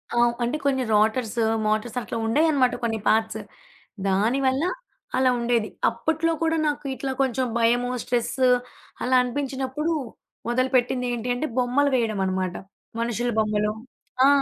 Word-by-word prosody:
ఆ! - - 0 0.3
అంటే 240 +5 0
కొన్ని 265 -2 +2
రోటర్స్, 220 +2 +2 0.3
మోటర్స్ 215 +3 -1
అట్లా 230 - -5
ఉండేవన్నమాట. 275 +1 +3
కొన్ని 225 -2 0
పార్ట్స్ 220 0 +1 0.7
దానివల్ల 260 +8 +2 0.5
అలా 260 0 +4
ఉండేది. 235 -2 +1 0.2
అప్పట్లో 320 +7 0
కూడా 325 0 +2
నాకు 295 0 -2
ఇట్లా 265 0 -3
కొంచెం 260 -1 +1
భయము, 240 +2 +2
స్ట్రెస్ 245 +1 -1 0.7
అలా 255 +1 +2
అనిపించినప్పుడు 270 +4 -2 0.6
మొదలుపెట్టింది 250 0 +1
ఏంటి 240 +1 -3
అంటే 310 +5 -2
బొమ్మలు 255 +3 +2
వేయడమనమాట. 190 -6 -1 0.5
మనుషుల 240 +1 -1
బొమ్మలు. 210 0 +1 0.5
ఆ! - - +7
245 Hz, 120 wpm, -24 LUFS, 225-265 Hz, 0.7 s, ఆ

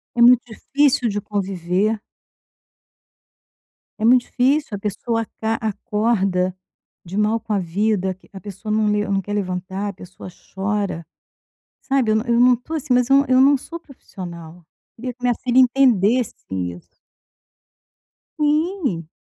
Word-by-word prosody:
É 240 - +1
muito 245 0 +7
difícil 275 0 +1
de 205 0 -2
conviver. 195 +1 -1 2.0
É 220 - 0
muito 250 +2 +6
difícil 270 -2 +1
a - - -4
pessoa 225 +3 -2
aca 220 0 -3
acorda 210 -4 0 0.5
de 185 +3 -7
mal 215 +2 +2
com 220 -1 -9
a 205 - +2
vida, 190 +2 0
que 185 - -24
a 195 - -9
pessoa 205 +2 -7
não 215 0 +2
le 210 0 +1
não 195 -1 +1
quer 205 +2 -6
levantar, 190 0 -3
a - - -6
pessoa 185 0 -11 0.2
chora, 195 -3 -2 0.8
sabe, 265 -5 +1
eu 215 - +3
não 220 - 0
eu 235 -1 +2
não 250 +1 +6
estou, 250 +7 -7
assim, 300 -4 -1
mas 250 +1 +2
eu 275 - +7
não 280 - +3
eu 255 0 +4
não 280 +1 +5
sou 335 +6 -9
profissional, 175 - -11 0.3
queria 250 +2 -5
que 245 - -35
minha 245 -1 +1
filha 255 +2 +1
entendesse 245 -3 +3 0.2
isso. 90 -2 -5 1.5
Sim, 300 - 0
215 Hz, 155 wpm, -21 LUFS, 190-250 Hz, 2.0 s, muito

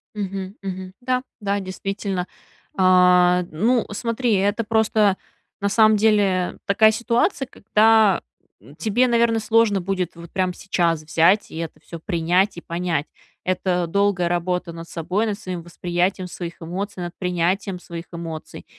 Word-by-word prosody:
Мгм, 195 -1 -4
мгм. 190 -1 -6
Да, 255 0 0 0.2
да, 200 -1 -1
действительно. 195 -1 -4 0.5
Э, 180 -1 +5
ну 225 +8 +1
смотри, 230 +2 -1
это 205 +4 +1
просто, 215 -2 +2 0.4
на 200 - +1
самом 215 +1 +5
деле, 200 -4 +2
такая 215 +2 +5
ситуация, 240 - 0
когда 220 -3 +3 0.6
тебе, 235 +4 +2
наверно, 235 -1 +2
сложно 220 -3 +2
будет 180 -1 -2
вот 170 0 -12
прям 185 -1 0
сейчас 170 -4 0
взять, 165 +6 +3
и - - -8
это 165 -1 -6
всё 170 - -10
принять 180 +2 +1
и - - -6
понять. 170 -4 -2 0.4
Это 180 -1 0
долгая 200 -1 +1
работа 175 0 -1
над 165 0 -9
собой, 185 +7 -1
над 205 -1 -3
своим 185 -5 -5
восприятием 175 +2 -2
своих 175 -1 -7
эмоций, 185 +3 -5
над 175 0 -5
принятием 180 +1 -1
своих 170 -1 -8
эмоций. 165 -2 -7
190 Hz, 140 wpm, -22 LUFS, 175-210 Hz, 0.6 s, Э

